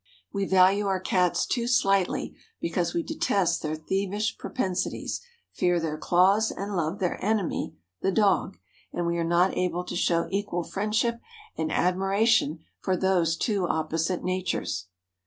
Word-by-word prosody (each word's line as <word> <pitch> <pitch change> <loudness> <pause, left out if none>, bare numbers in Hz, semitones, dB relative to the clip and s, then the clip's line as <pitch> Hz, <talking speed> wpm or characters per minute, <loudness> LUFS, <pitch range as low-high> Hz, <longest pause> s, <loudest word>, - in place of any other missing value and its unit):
We 200 -1 0
value 190 +2 +4
our 190 -1 +1
Cats 180 -1 +1
too 235 -2 -1
slightly 195 -6 +1 0.2
because 170 0 -1
we 170 - +1
detest 180 -4 0
their 155 0 -2
thievish 195 +6 -1
propensities, 190 -8 -2 0.3
fear 175 -1 +1
their 160 -2 -2
claws 195 +5 +4
and 200 +1 -4
love 165 +1 -1
their 180 -3 -2
enemy, 210 -3 -1 0.3
the 195 - +1
dog, 195 -1 +2 0.3
and 175 - -2
we 170 0 0
are - - +1
not 175 +3 +2
able 180 -1 0
to 180 - -6
show 170 -1 +1
equal 195 -3 -1
friendship 220 +5 -1 0.4
and 160 - -2
admiration 195 -3 +2 0.2
for 185 -1 0
those 175 -3 +2
two 200 -5 0
opposite 165 +3 -1
natures. 180 - -2
185 Hz, 145 wpm, -27 LUFS, 170-200 Hz, 0.4 s, value